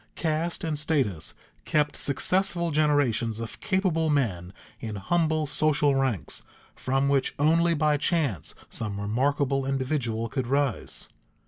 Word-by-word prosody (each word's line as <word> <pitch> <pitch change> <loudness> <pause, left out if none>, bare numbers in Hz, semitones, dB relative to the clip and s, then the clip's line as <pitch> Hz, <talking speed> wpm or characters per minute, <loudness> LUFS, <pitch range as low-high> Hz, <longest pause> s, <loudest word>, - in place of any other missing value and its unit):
Caste 165 +1 -1
and 155 -3 -1
status 135 - -1 0.3
kept 150 -1 +1
successful 175 +4 +1
generations 140 -7 +1
of 115 -1 -7
capable 185 -5 +1
men 100 - 0 0.3
in 110 -2 -5
humble 155 - +1
social 145 0 +2
ranks 130 - -1 0.3
from 135 +2 0
which 140 -1 +1
only 165 +3 +3
by 150 -1 +2
chance 145 - -1 0.2
some 105 -3 -3
remarkable 135 +6 0
individual 130 -4 -1
could 130 +1 -3
rise. 140 -3 -1
140 Hz, 120 wpm, -26 LUFS, 120-155 Hz, 0.3 s, only